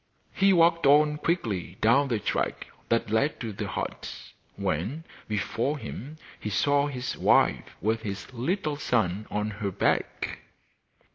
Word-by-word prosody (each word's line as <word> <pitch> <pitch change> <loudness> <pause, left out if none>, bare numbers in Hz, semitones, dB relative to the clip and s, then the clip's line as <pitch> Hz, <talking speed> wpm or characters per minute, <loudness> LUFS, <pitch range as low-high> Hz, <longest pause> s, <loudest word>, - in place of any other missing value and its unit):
He 195 +1 +4
walked 170 -3 +4
on 150 +1 +5
quickly 105 - -1
down 130 +6 +4
the 120 -4 0
track 105 - -1 0.2
that 115 -2 +1
led 135 +7 +1
to 115 -3 -4
the 100 +1 -4
hut, 100 - -5 0.2
when, 115 - -2 0.2
before 115 +7 -1
him, 145 +2 -7 0.2
he 105 - -4
saw 145 +8 +2
his 130 -3 -4
wife - - +3
with 110 +2 +1
his 100 +2 -6
little 150 - -1
son 105 -7 0
on 105 +1 -1
her 100 - 0
back. 95 - -1
120 Hz, 140 wpm, -27 LUFS, 105-150 Hz, 0.2 s, on